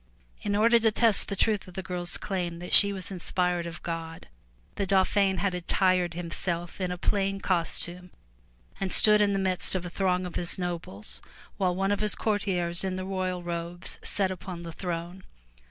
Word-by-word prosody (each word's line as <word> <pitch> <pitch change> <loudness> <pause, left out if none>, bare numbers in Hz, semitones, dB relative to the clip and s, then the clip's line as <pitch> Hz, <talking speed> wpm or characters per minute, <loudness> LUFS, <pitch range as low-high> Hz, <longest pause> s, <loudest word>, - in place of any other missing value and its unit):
In 205 0 -1
order 230 +3 +5
to 225 -1 +3
test 225 -1 +2
the 200 - -3
truth 210 0 +1
of 185 - -13
the 190 - -4
girFs 175 -1 -3
claim 180 -4 -3
that 175 +1 -6
she 200 0 +10
was 195 -1 -6
inspired 180 -1 -1
of 170 0 -9
God, 165 - -6 0.4
the 200 - -2
Dauphin 195 0 +3
had 195 -1 0
attired 180 -1 +1
himself 175 +1 -3
in 185 - 0
a 180 - -3
plain 195 +1 0
costume 180 0 -2 0.7
and 195 -1 -2
stood 210 -1 +5
in 205 -1 +3
the - - +1
midst 190 -1 0
of 180 -1 -2
a 175 - -6
throng 185 -1 0
of 180 - -5
his 175 - -2
nobles 170 - -5 0.4
while 185 -3 +1
one 195 +2 0
of 205 - +1
his 210 0 0
courtiers 185 -5 -1
in 190 -1 -1
the 185 0 -4
royal 185 -2 -2
robes 175 +1 -2
sat 195 -2 +1
upon 180 -1 -7
the 170 - -6
throne. 175 +1 -5
185 Hz, 185 wpm, -28 LUFS, 175-195 Hz, 0.7 s, she